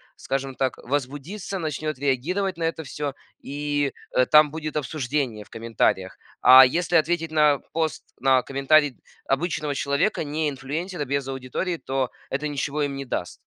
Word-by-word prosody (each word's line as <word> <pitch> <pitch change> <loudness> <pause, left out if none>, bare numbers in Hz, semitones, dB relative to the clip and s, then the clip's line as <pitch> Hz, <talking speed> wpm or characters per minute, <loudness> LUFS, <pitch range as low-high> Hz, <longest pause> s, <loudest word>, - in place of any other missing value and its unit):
скажем 135 -1 -3
так, 130 -1 -1
возбудится, 145 - -3
начнёт 155 -2 -3
реагировать 170 +8 0
на 165 - -3
это 165 0 -1
всё, 145 +1 -4 0.3
и, 145 0 -2 0.2
э, 130 - +4
там 150 -1 +6
будет 155 -1 -5
обсуждение 135 -6 -2
в - - -23
комментариях. 110 -4 0 0.2
А 130 +1 +10
если 175 +5 0
ответить 165 0 +2
на 150 -2 +4
пост, 160 -2 -1 0.2
на 130 -1 +4
комментарий 140 +1 +3 0.3
обычного 150 0 -1
человека, 140 +7 0
не 155 +1 -1
инфлюенсера, 150 +5 -4
без 140 0 -1
аудитории, 135 +7 -3
то 135 -3 -2 0.2
это 150 +3 -2
ничего 145 +1 -2
им 140 -1 -2
не 135 - -4
даст. 90 -7 -4
145 Hz, 150 wpm, -24 LUFS, 135-155 Hz, 0.3 s, А